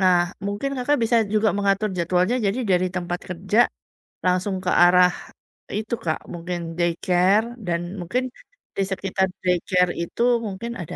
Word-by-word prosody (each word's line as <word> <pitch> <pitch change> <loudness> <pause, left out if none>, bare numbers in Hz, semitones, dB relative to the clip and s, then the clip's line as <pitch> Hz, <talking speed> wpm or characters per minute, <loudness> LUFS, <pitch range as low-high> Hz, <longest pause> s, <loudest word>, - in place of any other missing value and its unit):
Nah, 185 -2 +5 0.3
mungkin, 205 +7 -2
Kakak, 275 +4 +1
bisa 230 +1 +3 0.2
juga 215 0 +3
mengatur 200 +1 +1
jadwalnya 180 +7 +1
jadi 200 +6 0
dari 180 0 +3
tempat 175 0 -2
kerja, 190 +5 -1 0.7
langsung 185 +2 +1
ke 180 - -1
arah 180 0 +6 0.7
itu, 220 +2 -4
Kak, 160 - 0
mungkin 175 +1 -4 0.2
daycare 180 +5 +2 0.2
dan 170 -1 -1 0.2
mungkin 245 +9 -1 0.5
di 195 - +2
sekitar 190 0 0 0.2
daycare 180 0 +2
itu 170 +7 -5 0.3
mungkin 205 +5 -5
ada 160 - -7
185 Hz, 140 wpm, -23 LUFS, 180-210 Hz, 0.7 s, arah